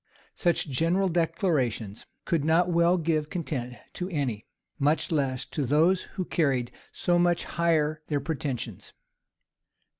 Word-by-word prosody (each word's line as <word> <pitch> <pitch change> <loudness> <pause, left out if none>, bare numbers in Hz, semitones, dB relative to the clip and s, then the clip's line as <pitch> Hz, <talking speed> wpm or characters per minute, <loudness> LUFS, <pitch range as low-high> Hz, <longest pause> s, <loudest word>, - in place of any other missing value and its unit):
[*] - - -31
Such 175 -2 +1
general 165 +8 +1
declarations 155 - -1 0.2
could 165 -4 +1
not 170 +3 +3
well 170 +1 +4
give 155 -2 0
content 135 -9 -4 0.2
to 180 +1 -4
any, 135 - -2 0.3
much 150 +5 +2
less 135 -5 0
to 150 - -3
those 160 +8 +3 0.2
who 185 - -1
carried 135 -9 0 0.2
so 175 0 +1
much 175 -1 +2
higher 155 -2 +1
their 145 -2 0
pretensions. 130 - -4
155 Hz, 130 wpm, -27 LUFS, 135-170 Hz, 0.3 s, well